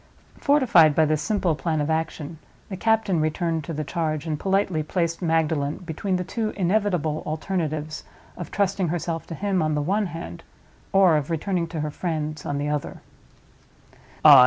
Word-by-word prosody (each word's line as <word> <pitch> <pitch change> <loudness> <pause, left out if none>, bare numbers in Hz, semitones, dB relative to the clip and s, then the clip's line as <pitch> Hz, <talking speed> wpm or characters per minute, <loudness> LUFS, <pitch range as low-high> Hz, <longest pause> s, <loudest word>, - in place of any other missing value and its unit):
Fortified 235 - +5
by 160 - +5
this 155 0 +1
simple 200 -6 +1
plan 155 +1 -1
of 150 +2 0
action, 160 -1 -3 0.3
the 195 - -4
captain 220 -3 +2
returned 160 +1 0
to - - -5
the 155 -1 -2
charge, 155 -1 -2
and 155 -2 -2
politely 195 -4 +1
placed 170 +2 -1
Magdalen 160 -3 +1
between 185 +4 -2
the 180 - -1
two 215 +4 -2
inevitable 180 -5 +1
alternatives 155 -2 -2 0.3
of 175 - -7
trusting 195 -2 0
herself 165 0 -3
to 165 - -5
him, 195 0 0
on 155 -1 +1
the 150 - +1
one 200 +5 +1
hand, 165 - -7 0.5
or 190 -5 +5
of 145 0 -2
returning 170 +1 -1
to 165 -2 -4
her 150 0 -2
friends, 155 -2 -3
on 145 - -1
the 145 +1 -1
other. 150 -1 -3
165 Hz, 165 wpm, -24 LUFS, 155-185 Hz, 0.5 s, Fortified